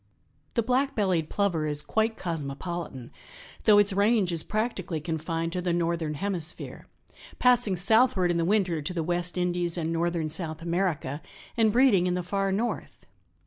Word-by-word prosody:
The 235 - +2
Black 260 +4 +1
bellied 185 -7 +1
Plover 175 -7 0
is 150 0 -1
quite 220 0 0
cosmopolitan, 155 -4 -5 0.5
though 210 -2 +7
its 205 -1 +4
range 200 -1 +2
is 165 -2 +1
practically 200 -6 -2
confined 165 +1 -3
to 180 - -2
the 175 -1 0
northern 170 -2 -1
hemisphere, 180 -2 -4 0.5
passing 245 -6 +3
southward 195 -1 +3
in 170 - 0
the 170 - +1
winter 180 -4 +1
to 150 +5 -4
the 165 - -1
West 175 +2 -1
Indies 175 -1 0
and 165 -1 -1
northern 165 -2 -1
South 160 -1 -1
America 170 -5 -1 0.3
and 225 -2 +3
breeding 225 -7 +4
in 180 - 0
the 180 - -2
far 195 +2 -1
North. 225 +5 -3
175 Hz, 160 wpm, -27 LUFS, 165-205 Hz, 0.5 s, though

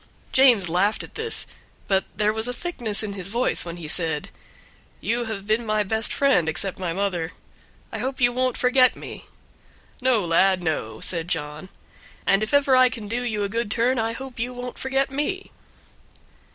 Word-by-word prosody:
James 245 -8 +5
laughed 185 +6 +1
at - - -12
this; 450 0 0 0.4
but 195 -1 +2
there 210 0 +2
was 220 +2 -2
a 245 - -2
thickness 235 - -2
in 205 -2 -4
his 190 -2 -5
voice 235 +5 +1
when 170 0 -6
he 165 -3 -7
said, 160 -2 +1 0.7
"You 235 +5 -1
have 210 -3 -5
been 215 +3 +1
my 215 -1 +1
best 220 +2 -1
friend 200 - +3
except 185 +4 -2
my 180 -3 -2
mother; 180 -3 -1 0.6
I - - -4
hope 265 +1 -3
you 245 -1 +4
won't 255 0 0
forget 255 0 +5
me." - - -9 0.7
"No, 245 -6 +3
lad, 185 +2 +3
no!" 110 -9 -2
said 170 -2 -2
John, 155 +1 -3 0.6
"and 195 +1 +4
if 215 - -1
ever 285 -2 +4
I 255 0 +6
can 225 -3 -7
do 235 +4 -2
you 220 -4 -1
a - - 0
good 230 +2 -2
turn 235 +4 +2
I 225 0 0
hope 260 0 -8
you 245 +2 -3
won't 245 0 -6
forget 270 +1 0
me." 335 +8 -3
220 Hz, 185 wpm, -24 LUFS, 185-250 Hz, 0.7 s, I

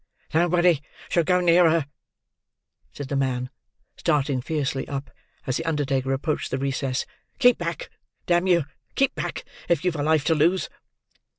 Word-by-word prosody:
"Nobody 175 -1 +3 0.3
shall 170 - +2
go 180 +2 +2
near 175 -1 +5
her," 160 -2 +2 1.1
said 145 -2 -7
the 140 - -1
man, 130 -2 -1 0.4
starting 140 -3 0
fiercely 140 -1 -2
up, 140 0 -5 0.3
as 130 - -1
the 165 - -4
undertaker 135 -4 0
approached 145 +3 -1
the 130 - -1
recess. 135 -1 -1 0.3
"Keep 245 -3 +5
back! 170 -1 -4 0.3
Damn 175 +1 +2
you, 170 -5 +3 0.3
keep 275 - +2
back, - - -4 0.2
if 170 0 +1
you've 180 -3 +1
a 145 - -2
life 155 0 +2
to 165 - +3
lose!" 170 +5 +2
155 Hz, 155 wpm, -24 LUFS, 135-175 Hz, 1.1 s, near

